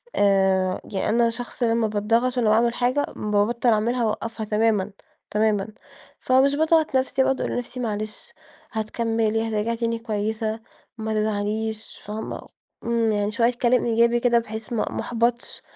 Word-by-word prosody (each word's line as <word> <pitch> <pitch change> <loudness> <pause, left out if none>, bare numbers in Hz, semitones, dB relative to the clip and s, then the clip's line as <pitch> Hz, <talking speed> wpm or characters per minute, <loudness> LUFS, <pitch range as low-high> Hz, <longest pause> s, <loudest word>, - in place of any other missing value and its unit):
آآ، 190 -2 +2
ي 190 - -1
أنا 235 +1 +3
شخص 245 +2 -5
لمّا 230 -1 +2
باضغط 230 +4 +1
وأنا 230 -3 +3
باعمل 230 +2 +3
حاجة 255 +4 +1
بابطل 210 +4 +1
أعملها 235 +3 +1
وأوقفها 220 0 -3
تمامًا، 210 -2 +1 0.4
تمامًا، 210 -2 +1 0.5
فمش 265 +2 +3
باضغط 315 -1 +2
نفسي 265 +1 +1
باقعد 265 0 0
أقول - - -2
لنفسي 245 +1 -4
معلش 215 -2 -4 0.4
هتكملي، 225 0 -1
هترجعي 220 +2 -1
تاني 230 0 -1
كويّسة 220 0 -2 0.4
ما 220 -1 -3
تزعليش 215 +1 -2
فاهمة، 215 +2 -6 0.4
إمم 230 -1 +1
يعني 205 0 0
شويّة 230 +2 +2
كلام 245 0 +3
إيجابي 235 +1 +3
كده 235 -1 +3
بحيث 220 0 -6
ما 230 - 0
ما - - -3
أحبطش 235 0 -1
225 Hz, 145 wpm, -24 LUFS, 215-240 Hz, 0.5 s, أنا